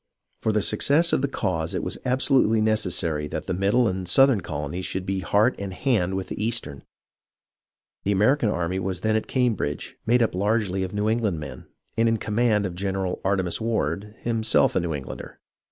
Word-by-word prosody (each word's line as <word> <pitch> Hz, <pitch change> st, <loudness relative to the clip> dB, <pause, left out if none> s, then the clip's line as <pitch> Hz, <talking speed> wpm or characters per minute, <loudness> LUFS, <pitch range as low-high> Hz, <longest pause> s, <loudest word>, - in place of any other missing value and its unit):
For 110 Hz, -, +1 dB
the 105 Hz, -1 st, +1 dB
suc 105 Hz, -, 0 dB
cess 165 Hz, +4 st, +4 dB
of -, -, +2 dB
the 140 Hz, -, +1 dB
cause 85 Hz, -11 st, -2 dB
it -, -, -2 dB
was -, -, -4 dB
absolutely 125 Hz, -3 st, +3 dB
necessary 90 Hz, -8 st, 0 dB
that -, -, -5 dB
the -, -, -2 dB
middle 100 Hz, +6 st, +2 dB
and 95 Hz, -2 st, -2 dB
southern 135 Hz, -1 st, +5 dB
colonies 80 Hz, +2 st, -4 dB
should 95 Hz, 0 st, -4 dB
be 95 Hz, 0 st, -1 dB
heart 105 Hz, +7 st, +2 dB
and 100 Hz, -1 st, -4 dB
hand 95 Hz, -4 st, 0 dB
with 95 Hz, -1 st, -4 dB
the 105 Hz, -, -4 dB
eastern. 110 Hz, -12 st, -2 dB, 1.2 s
The 100 Hz, -, 0 dB
American 110 Hz, +5 st, +3 dB
army 90 Hz, -1 st, -1 dB
was 95 Hz, -1 st, -3 dB
then 110 Hz, +1 st, +1 dB
at 110 Hz, -, -1 dB
Cam 125 Hz, -3 st, +2 dB
bridge, 75 Hz, -7 st, -4 dB
made 120 Hz, +1 st, +4 dB
up 115 Hz, -, 0 dB
largely 100 Hz, 0 st, 0 dB
of 95 Hz, -1 st, -3 dB
New 105 Hz, +1 st, 0 dB
England 110 Hz, -7 st, 0 dB
men, 70 Hz, -4 st, -9 dB, 0.3 s
and 115 Hz, +1 st, +3 dB
in 115 Hz, -, +1 dB
command 105 Hz, -1 st, +1 dB
of 90 Hz, -, -3 dB
General 95 Hz, 0 st, -3 dB
Artemas 95 Hz, -2 st, 0 dB
Ward, 105 Hz, -2 st, -2 dB
himself 115 Hz, -2 st, +2 dB
a -, -, +4 dB
New 85 Hz, -3 st, -2 dB
Englander. 70 Hz, -2 st, -8 dB
100 Hz, 195 wpm, -24 LUFS, 90-115 Hz, 1.2 s, southern